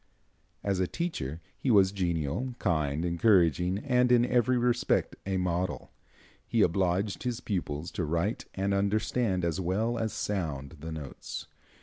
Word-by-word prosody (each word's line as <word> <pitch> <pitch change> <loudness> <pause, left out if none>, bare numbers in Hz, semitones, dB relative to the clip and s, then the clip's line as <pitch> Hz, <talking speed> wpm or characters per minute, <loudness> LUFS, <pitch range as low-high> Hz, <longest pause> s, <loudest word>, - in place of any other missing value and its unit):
As 100 -2 0
a 95 - +2
teacher 85 - -3
he 135 - -2
was 100 -4 +6
genial, 90 - -1
kind, 75 -3 0
encouraging 90 -1 +3
and 125 +1 +2
in 120 -1 +5
every 125 0 +2
respect 120 0 +1
a 95 -1 0
model. 90 0 -2 0.6
He 115 -3 +3
obliged 95 +2 +1
his 125 -2 -2
pupils 85 -8 -3
to 100 -5 -2
write 85 +7 -1
and 100 +1 0
understand 100 -1 +1
as 85 0 -1
well 110 +7 0
as 110 -1 -1
sound 80 -7 -3
the 80 +2 -6
notes. 75 -4 -6
95 Hz, 140 wpm, -29 LUFS, 85-115 Hz, 0.6 s, was